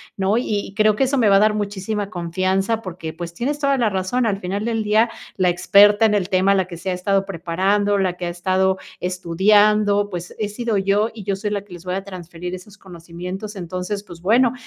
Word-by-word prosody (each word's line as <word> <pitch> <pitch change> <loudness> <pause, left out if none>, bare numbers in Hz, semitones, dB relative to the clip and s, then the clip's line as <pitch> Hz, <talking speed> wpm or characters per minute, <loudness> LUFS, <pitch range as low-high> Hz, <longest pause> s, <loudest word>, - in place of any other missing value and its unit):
¿no?, 195 +3 +1
y 205 -5 -2
creo 215 -1 +4
que 270 - +1
eso 270 +1 +1
me 235 -4 +3
va 195 - +5
a - - +6
dar 215 +1 +4
muchísima 205 0 -3
confianza 190 +5 -1
porque, 170 -4 -6
pues, 170 +1 -7
tienes 285 +9 -2
toda 275 -1 +2
la 235 -4 +2
razón. 195 +6 -1
Al 200 -3 0
final 195 +2 -3
del 225 -1 -1
día, 220 +3 +3 0.3
la 185 -2 +2
experta 205 +4 +5
en 215 - +3
el 195 -3 0
tema, 190 +1 +3
la 190 -2 +1
que 170 - -7
se 185 +3 -5
ha 185 - 0
estado 195 +2 0
preparando, 195 +3 0
la 185 -2 +1
que 180 0 -5
ha - - -2
estado 185 +2 +1 0.2
estudiando, 205 +3 +3
pues, 175 -2 -6
he 215 - 0
sido 225 0 -2
yo 200 +3 +1
y 215 -3 -9
yo 200 -1 0
soy 210 +2 -3
la 200 -1 -3
que 190 - -14
les 175 0 -10
voy 180 0 -3
a 195 - -3
transferir 180 -1 -7
esos 190 +3 -13
conocimientos. 180 +3 -8
Entonces, 185 +3 -4
pues, 175 -4 -12
bueno, 235 +5 +3
195 Hz, 225 wpm, -21 LUFS, 180-210 Hz, 0.3 s, a